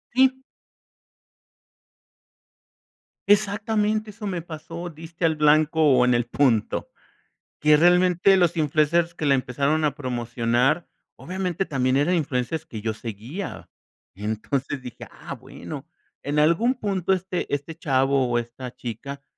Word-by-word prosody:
Sí. 260 0 +4 2.9
Exactamente 215 +1 +1
eso 210 +1 -8
me 185 -4 -2
pasó, 165 +1 -7
diste 165 +2 -9
al 160 -1 +3
blanco 155 +1 +3
o 130 -3 +5
en 125 0 +3
el 120 0 +1
punto, 120 -3 +1 0.7
que 150 0 +5
realmente 180 +3 +4
los 175 -2 +2
influencers 160 +2 +2
que 155 - -2
la 140 - +5
empezaron 140 +5 0
a 145 -1 0
promocionar, 125 +3 0 0.3
obviamente, 185 0 -3
también 130 -2 +1
eran 145 +6 +2
influencers 155 0 -1
que 110 -9 -7
yo 110 +1 -1
seguía, 115 - -7 0.5
y 100 - -13
entonces 130 +6 -2
dije: 125 -2 -10
"Ah, - - -8
bueno, - - -9 0.3
en 145 +2 -2
algún 170 - +3
punto 195 -5 -1
este 185 -1 -2
este 145 +3 -3
chavo 135 -4 +1
o 120 - +2
esta 120 +1 -7
chica 135 +4 -7
150 Hz, 130 wpm, -24 LUFS, 130-175 Hz, 2.9 s, o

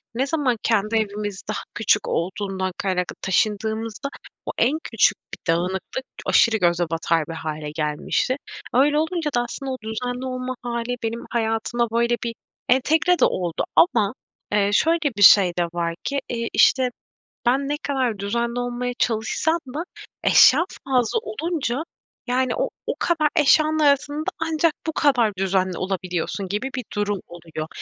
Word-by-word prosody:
ne 265 +3 0
zaman 275 -6 0
kendi 220 -1 +1
evimiz 205 -2 -2
daha 215 - -3
küçük 210 -2 +2
olduğundan 190 +1 -2
kaynaklı 180 -2 -1
taşındığımızda 220 +6 -1 0.4
o - - -2
en 265 +7 +2
küçük 225 - +3 0.2
bir 165 - -1
dağınıklık 190 +9 -3 0.2
aşırı 225 -2 +4
göze 175 -2 +2
batar 165 -1 0
bir 165 - -5
hâle 155 -2 -5
gelmişti. 150 +10 0 0.4
Öyle 285 +4 +4
olunca 320 0 -1
da 240 - +3
aslında 265 +3 -5
o 260 - -3
düzenli 245 +3 -4
olma 255 0 -3
hâli 240 0 -2
benim 230 +1 -3
hayatıma 230 +1 0
böyle 235 +1 +2
bir 230 -1 -3 0.3
entegre 315 +7 +3
de - - +6
oldu 175 -3 -1
ama, 225 - +4 0.4
eee, 205 -1 +3
şöyle 330 +9 +3 0.2
bir - - -2
şey 190 -2 +8
de - - +3
var 170 -1 -1
ki, 280 0 -1
iii, 230 -1 -2
işte, 260 -2 +4 0.6
ben 270 +3 +2
ne 295 - +1
kadar 255 -7 0
düzenli 235 +4 -1
olmaya 245 0 -2
çalışsam 240 +8 +1 0.2
da 320 - -2 0.4
eşya 300 +6 +6 0.2
fazla 255 - +2
olunca, 320 - -2 0.4
yani, 255 0 +1
o - - -1 0.2
o - - +1
kadar 320 -3 +2
eşyanın 310 0 +4
arasında 290 +1 +2
ancak 325 0 +1
bu 320 - -1
kadar 255 -8 +3
düzenli 185 -1 0
olabiliyorsun 185 0 -3
gibi 210 +8 -2
bir 255 - -3
durum 205 -1 0
oluyor. 165 -2 -7
235 Hz, 150 wpm, -23 LUFS, 195-270 Hz, 0.6 s, şey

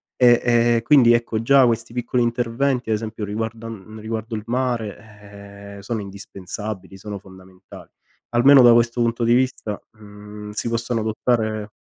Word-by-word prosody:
E 120 -2 +5
e 120 -1 +3
e 115 - +1
quindi, 125 -3 +5
ecco, 115 -1 0
già 135 +2 +5
questi 115 -1 -1
piccoli 125 0 -1
interventi, 120 +1 -1
ad 110 - +2
esempio, 110 -1 -6
riguardan 110 0 -6
riguardo 110 +1 -5
il 105 - -5
mare, 105 -4 -6
eh, - - -11
sono 110 +1 -4
indispensabili, 100 0 -8
sono 100 +1 -7
fondamentali. 95 0 -15 0.4
Almeno 135 +3 +6
da 120 -1 +7
questo 120 +1 +2
punto 115 0 0
di 115 - +3
vista, 125 -4 -1
mh, 105 0 -12
si 110 - -4
possono 115 0 -2
adottare 110 -1 -1
115 Hz, 150 wpm, -21 LUFS, 105-120 Hz, 0.4 s, da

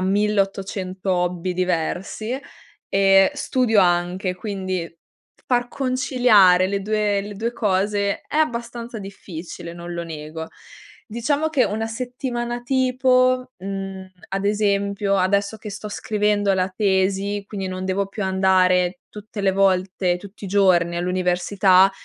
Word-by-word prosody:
1800 195 -1 0
hobby 180 0 -1
diversi, 185 +7 -2 0.5
e 195 +1 +5
studio 250 -7 +2
anche, 180 +1 +1
quindi 185 -3 -3 0.5
f - - -31
far 245 -1 +1
conciliare 245 -9 +4
le 200 +1 -1
due 210 0 0
le 205 +1 -7
2 230 +4 -2
cose 200 -1 0
è - - -4
abbastanza 235 -5 -2
difficile, 175 -3 -8
non 175 0 -7
lo 170 0 -3
nego. 160 0 -7 0.6
Diciamo 285 +7 0
che 280 -5 +2
una 220 +2 -2
settimana 240 0 -4
tipo, 255 0 +2
mhmm, 195 0 -6 0.2
ad 195 +1 -3
esempio, 200 -1 +1
adesso 200 +3 +1
che 210 0 -8
sto 210 +1 -7
scrivendo 205 -1 0
la 185 0 +1
tesi, 195 +1 0
quindi 195 -2 -5
non 185 0 -4
devo 190 +1 0
più 205 +1 -5
andare 185 -1 +2
tutte 210 0 -8
le 195 -1 +2
volte, 185 -2 +1
tutti 200 +2 -12
i - - -5
giorni 180 -4 +3
all'università, 185 +2 +3
195 Hz, 130 wpm, -22 LUFS, 185-215 Hz, 0.6 s, e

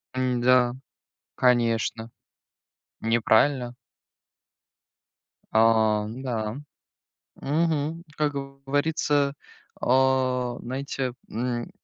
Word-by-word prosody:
М-да, 125 -1 +3 0.6
конечно, 115 -2 +1 0.9
неправильно. 120 +3 +2 1.8
А, 110 -1 +4
ну 120 +4 -7
да. 110 -3 -3 0.8
Мгм. 160 +2 -1
Как 150 -1 +1
говорится, 140 +1 -1 0.5
а, 130 -1 +2
знаете, 130 0 -4
м, 120 +1 -3
125 Hz, 60 wpm, -25 LUFS, 120-140 Hz, 1.8 s, А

